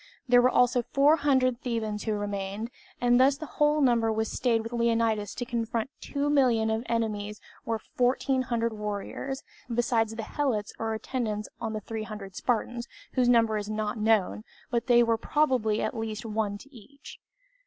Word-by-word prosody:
There 245 0 +6
were 250 - +5
also 250 0 +3
400 275 -2 +3
Thebans 220 -4 -2
who 220 - 0
remained; 205 +2 -3 0.3
and 245 0 +4
thus 270 +2 +5
the 310 - -6
whole 295 0 +2
number 235 -4 +3
that 220 0 0
stayed 230 0 0
with 230 +1 -7
Leonidas 230 -3 +1
to 245 - -3
confront 235 0 -2
two 285 0 -2
million 245 -6 +3
of 220 0 0
enemies 210 -2 -2 0.3
were 225 -1 0
fourteen 255 +3 0
hundred 230 -2 -1
warriors, 210 +6 -4 0.3
besides 230 -2 +1
the 225 - -4
helots 225 -5 -1
or 225 0 -1
attendants 220 -2 -3
on 225 -2 -3
the 215 - -3
300 215 -3 -6
Spartans, 240 0 -1 0.3
whose 250 -2 +3
number 230 -3 +4
is 205 0 -4
not 215 +1 -2
known, 215 -1 +2 0.3
but 235 0 0
there 240 -1 +6
was 230 -1 +1
probably 255 -8 +1
at - - -2
least 225 0 -4
one 215 -2 -1
to 275 +6 -16
each. 275 +6 -13
230 Hz, 165 wpm, -28 LUFS, 215-250 Hz, 0.3 s, There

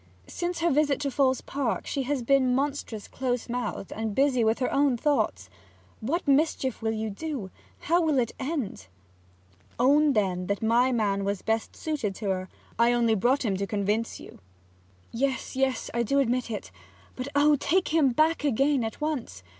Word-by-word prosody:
Since 350 - -4
her 340 0 +3
visit 290 0 +2
to 280 -1 -1
Falls 260 -1 +2
Park 270 -4 -2
she 280 - -2
has 280 -4 0
been 260 0 +3
monstrous 270 -6 -2
close 250 -2 -2
mouthed 240 -5 -4
and 220 -2 -3
busy 265 -3 +3
with 220 +1 +2
her 250 - -1
own 275 -3 +3
thoughts. 290 +4 0 0.5
What 290 +11 -2
mischief 275 -3 +1
will 220 0 0
you 220 0 -3
do? 240 -4 -5 0.3
How 340 +3 +2
will 310 -4 +2
it 240 -3 +1
end?' 260 - -4 0.9
'Own, 285 +4 +4
then, 185 -5 0
that 200 +2 -2
my 240 +3 +3
man 205 -4 0
was 200 -1 -2
best 225 0 -1
suited 275 -11 -3
to 200 -2 -2
her. 185 0 -3 0.3
I 235 +1 +5
only 235 -2 +3
brought 245 +6 +2
him 200 -3 +1
to 200 +1 -2
convince 210 +3 -1
you.' - - -12 0.7
'Yes, 265 +2 -2
yes; 265 -2 0
I 235 - +1
do 255 +5 +1
admit 250 -2 +1
it. 215 - -5 0.4
But 255 +1 -5
oh! 290 +1 +5
do 295 - +4
take 365 +7 +1
him 310 -4 +4
back 310 +6 +2
again 275 0 +2
at 225 +6 -5
once! 260 - -3
255 Hz, 180 wpm, -27 LUFS, 220-285 Hz, 0.9 s, I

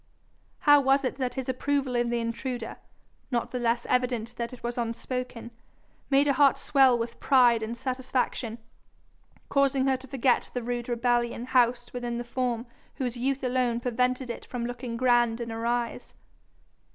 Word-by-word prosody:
How 290 -4 +7
was 270 0 +3
it 255 - -2
that 255 -2 -2
his 265 -2 -4
approval 265 0 -1
of 240 0 +1
the 240 0 0
intruder, 230 +1 -4 0.5
not 240 -3 -1
the 250 - -2
less 235 0 0
evident 245 -2 0
that 235 0 -3
it 250 - -12
was 240 0 -2
unspoken, 240 0 -4 0.6
made 275 +1 +4
her 280 - +3
heart 275 0 +5
swell 265 -4 +4
with 230 0 -5
pride 245 -4 +5
and 225 +2 -4
satisfaction, 255 -2 -2 0.9
causing 275 -1 +2
her 265 -1 +2
to 265 +1 -12
forget 260 -2 +1
the 245 - -2
rude 240 0 -3
rebellion 240 0 0
housed 245 -1 +2
within 240 -1 -3
the 240 - -3
form 240 -1 -2 0.3
whose 250 -2 -2
youth 265 +2 -1
alone 250 -2 +1
prevented 250 +1 0
it - - -7
from 245 -2 -4
looking 245 -1 -5
grand 240 -2 +3
in 235 -1 -4
her 225 +1 -3
eyes? 240 0 -2
245 Hz, 165 wpm, -27 LUFS, 235-260 Hz, 0.9 s, How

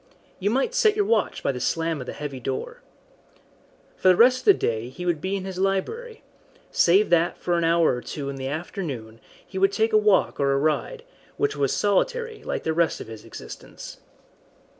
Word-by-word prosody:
You 200 +1 0
might 265 - 0
set 445 -4 +3
your 415 -1 +1
watch 220 - 0
by - - +1
the 125 - -6
slam 165 +3 -1
of 125 - -8
the - - -5
heavy 145 -3 -6
door. 465 - -5 1.2
For - - +1
the 185 - +7
rest 250 +5 +5
of - - -15
the 405 - +8
day 115 +1 -2
he 180 +7 -8
would 170 -4 0
be 190 +3 -2
in 190 -1 -4
his 190 -1 -6
library 315 - -2 0.5
save 190 +4 +4
that 170 0 +3
for 175 - -1
an 170 - +1
hour 165 -2 +3
or - - -6
two 140 +1 -6
in 140 0 -5
the 130 0 -4
afternoon 140 - -5 0.3
he 190 - -6
would 195 +1 +4
take 220 +2 0
a 215 - +6
walk 210 -2 +2
or 140 -1 +2
a - - +2
ride, 155 - -1 0.3
which 425 0 0
was - - 0
solitary 485 -3 0
like - - -3
the 160 - 0
rest 170 0 +1
of - - -7
his 110 -1 -10
existence. - - -10
180 Hz, 205 wpm, -24 LUFS, 145-230 Hz, 1.2 s, the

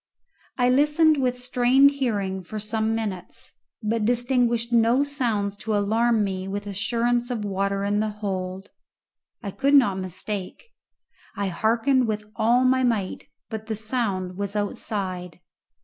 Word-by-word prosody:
I 245 -1 +3
listened 295 +4 +4
with 250 -1 0
strained 250 +2 +4
hearing 205 -9 -2
for 215 +5 -7
some 220 +1 -1
minutes, 205 -5 -5 0.3
but 220 +1 0
distinguished 240 0 +1
no 235 +4 +4
sounds 230 -8 -1
to 215 0 -1
alarm 220 +2 +2
me 190 -1 -3
with 205 +1 -4
assurance 235 +4 0
of 225 -4 -3
water 200 0 -1
in 205 +1 +1
the 215 0 0
hold. 190 -2 -5 0.7
I 200 - -4
could 280 +7 +2
not 205 -9 +4
mistake. 190 - -6 0.6
I 200 -1 -1
hearkened 230 +7 +2
with 215 -1 -2
all 235 +3 +3
my 260 0 +3
might, 220 -6 -1 0.2
but 220 -1 -6
the 220 -2 -3
noise 190 -7 -1
was 200 +1 -4
outside. 190 -4 -3
220 Hz, 140 wpm, -24 LUFS, 200-245 Hz, 0.7 s, listened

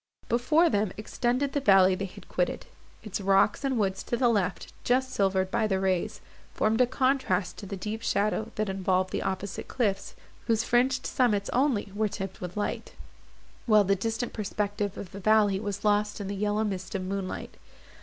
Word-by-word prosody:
Before 305 +8 +3
them, 205 - +1
extended 250 +5 -1
the 285 - +1
valley 195 -5 +6
they 195 +1 -2
had 185 - -12
quitted; - - -1 0.4
its 210 -2 -4
rocks, 195 +5 +3
and 270 -2 0
woods 195 -3 0
to 240 - -2
the 245 0 +3
left, 195 -5 -1
just 260 +1 +1
silvered 190 -1 +1
by 230 -1 +1
the 190 -2 0
rays, 190 -2 -1 0.3
formed 220 +3 +2
a 250 - +5
contrast 255 -8 0
to 200 - -8
the 195 - -5
deep 215 +4 -4
shadow, 215 +1 0
that 215 0 -1
involved 185 -1 0
the - - -2
opposite 190 +1 -4
cliffs, 200 -6 -1 0.3
whose 225 -1 +2
fringed 255 +2 +2
summits 210 -6 +1
only 245 -7 +1
were 215 +1 +1
tipped 195 -1 -6
with 180 +2 -6
light; 205 - -3 0.7
while 215 -2 +6
the 195 0 +2
distant 225 +4 -3
perspective 205 -1 -2
of 190 - -7
the 195 - -8
valley 205 -1 +3
was 205 0 -4
lost 210 0 +2
in 200 - -4
the 200 - -3
yellow 210 +2 0
mist 190 -3 -4
of 190 - -2
moonlight. 190 0 -4
205 Hz, 185 wpm, -28 LUFS, 195-230 Hz, 0.7 s, valley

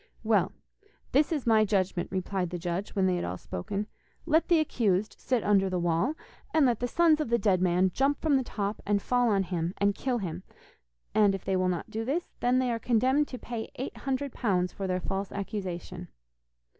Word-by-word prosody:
'Well, - - +2 0.6
this 295 +5 +3
is 300 -5 -1
my 220 -2 +5
judgment,' 190 -4 0
replied 185 -1 -2
the 180 - -4
judge, 175 +4 -4
when 195 -2 +2
they 185 -1 +2
had - - -2
all 90 +1 -3
spoken: 195 - -4 0.4
'Let 320 +2 +3
the 345 - +5
accused 215 -9 0
sit 250 -4 0
under 195 -2 +3
the 185 - -1
wall, 175 - +1 0.4
and 310 -3 +5
let 240 -4 +2
the 245 - -1
sons 315 +2 +3
of 300 - -2
the 235 - +3
dead 195 -4 +2
man 185 +1 +3
jump 275 +2 +1
from 310 -3 +2
the 265 - +3
top 205 -3 -3
and 205 0 +1
fall 245 +3 +2
on 195 -2 +2
him 175 -1 -3
and 200 0 +2
kill 250 +4 -1
him, 180 -5 -4 0.7
and 205 -2 +4
if 195 - -8
they 190 - +1
will 185 0 +2
not 175 -2 -3
to 220 +1 -2
this, 295 +9 -2
then 245 +1 +2
they 255 -1 +1
are 230 - -1
condemned 260 +6 +2
to 255 - -7
pay 235 -2 -6
eight 260 - -5
hundred 270 0 -3
pounds 180 -6 0
for 195 - -4
their 185 0 -1
false 195 +2 -3
accusation. 190 - -5
205 Hz, 210 wpm, -28 LUFS, 185-250 Hz, 0.7 s, my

